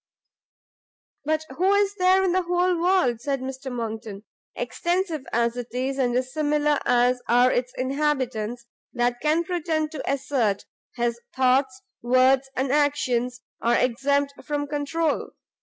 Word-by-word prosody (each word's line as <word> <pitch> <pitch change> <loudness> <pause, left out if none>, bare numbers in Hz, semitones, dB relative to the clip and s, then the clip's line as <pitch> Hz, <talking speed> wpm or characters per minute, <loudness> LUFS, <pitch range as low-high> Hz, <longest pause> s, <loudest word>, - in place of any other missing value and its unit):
"But 315 +1 0
who 375 +3 +3
is 405 0 +2
there 375 0 +3
in 375 - +2
the 370 +1 +2
whole 355 +1 +1
world," 345 -11 +2
said 275 +1 -1
Mr 265 +1 -6
Monckton, 220 -4 -5 0.3
"extensive 345 -5 -2
as 235 0 +1
it 245 -1 -5
is, 265 +2 -2
and 250 -2 +2
dissimilar 295 +3 +1
as 245 +1 +3
are 245 +2 +5
its 250 0 -1
inhabitants, 255 -4 -1 0.3
that 240 0 0
can 310 +3 +2
pretend 320 -3 -1
to 300 -3 -3
assert, 255 -7 0 0.3
his 235 -1 -1 0.2
thoughts, 260 0 +2 0.2
words, 255 +2 +3
and 260 0 0
actions, 255 -4 +1 0.2
are 235 - +3
exempt 280 +3 +1
from 290 -1 -2
controul? 300 +2 -2
270 Hz, 135 wpm, -24 LUFS, 245-310 Hz, 0.3 s, are